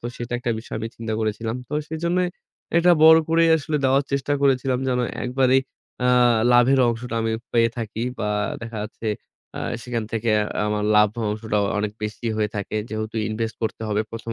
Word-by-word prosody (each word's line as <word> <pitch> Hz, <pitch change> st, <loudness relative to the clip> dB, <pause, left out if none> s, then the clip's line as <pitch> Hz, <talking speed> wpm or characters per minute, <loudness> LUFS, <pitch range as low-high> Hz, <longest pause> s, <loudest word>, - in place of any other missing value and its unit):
তো 120 Hz, -, -5 dB
সেটা 120 Hz, 0 st, -6 dB
একটা 120 Hz, 0 st, -2 dB
বিষয় 110 Hz, -, -8 dB
আমি 110 Hz, -, -3 dB
চিন্তা 115 Hz, -1 st, -4 dB
করেছিলাম। 110 Hz, +2 st, -2 dB
তো -, -, -11 dB, 0.2 s
সেজন্যই 170 Hz, +3 st, 0 dB, 0.5 s
এটা 170 Hz, +1 st, +5 dB
বড় 160 Hz, 0 st, +9 dB
করেই 165 Hz, 0 st, +4 dB
আসলে 155 Hz, 0 st, -2 dB
দেওয়ার 135 Hz, +1 st, +4 dB
চেষ্টা 140 Hz, +1 st, 0 dB
করেছিলাম 130 Hz, -2 st, +2 dB
যেন 125 Hz, -1 st, +1 dB, 0.2 s
একবারেই 130 Hz, +1 st, +3 dB, 0.4 s
এ্যাঁ 125 Hz, -2 st, +4 dB, 0.2 s
লাভের 125 Hz, +2 st, +5 dB
অংশটা 120 Hz, +1 st, -3 dB
আমি 110 Hz, 0 st, 0 dB, 0.2 s
পেয়ে 115 Hz, -1 st, +4 dB
থাকি 115 Hz, 0 st, -4 dB, 0.2 s
বা 105 Hz, -, -1 dB, 0.3 s
দেখা 115 Hz, -1 st, -6 dB
যাচ্ছে 110 Hz, +1 st, -6 dB, 0.5 s
আ -, -, -4 dB, 0.2 s
সেখান 120 Hz, -3 st, -3 dB
থেকে 115 Hz, 0 st, 0 dB, 0.4 s
আমার 105 Hz, 0 st, -1 dB
লাভ 105 Hz, 0 st, +6 dB, 0.2 s
অংশটা 105 Hz, 0 st, -2 dB, 0.2 s
অনেক 105 Hz, 0 st, -2 dB
বেশি 105 Hz, +2 st, -4 dB
হয়ে 105 Hz, -1 st, 0 dB
থাকে। 100 Hz, +1 st, -3 dB
যেহেতু 110 Hz, +1 st, -4 dB
invest 110 Hz, +1 st, -3 dB
করতে 110 Hz, 0 st, -3 dB
হবে 105 Hz, 0 st, +1 dB
১ম 115 Hz, 0 st, -6 dB
115 Hz, 175 wpm, -23 LUFS, 110-130 Hz, 0.5 s, বড়